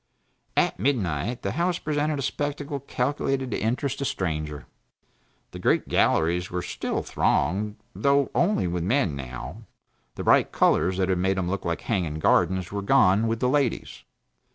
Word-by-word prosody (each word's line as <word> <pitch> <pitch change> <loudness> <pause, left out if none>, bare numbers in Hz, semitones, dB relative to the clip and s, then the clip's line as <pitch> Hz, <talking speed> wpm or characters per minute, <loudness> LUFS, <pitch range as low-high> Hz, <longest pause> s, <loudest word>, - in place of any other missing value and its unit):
At - - +2
midnight 110 - -1
the - - -1
House 175 +1 0
presented 150 -1 -1
a 140 - -3
spectacle 145 +1 -3
calculated 135 0 -2
to - - -1
interest 130 +5 -1
a - - 0
stranger. 75 - -3 0.9
The - - -8
great - - +1
galleries 90 +3 +2
were 90 0 -3
still - - -3
thronged 100 +8 0 0.2
though 140 -1 +2
only 175 - +2
with 90 0 -2
men, 105 - +1
now; 60 -3 -7 0.5
the - - -5
bright - - +4
colors 95 +1 +2
that 95 -1 +1
had 95 -1 +1
made 95 +1 +1
them 90 -1 -1
look 100 -1 -3
like 85 0 -2
hanging 90 -9 -1
gardens 90 +3 +2
were 100 0 -3
gone, 105 -2 +4
with 115 0 -2
the 125 - +3
ladies. 135 -2 -1
105 Hz, 160 wpm, -25 LUFS, 90-140 Hz, 0.9 s, bright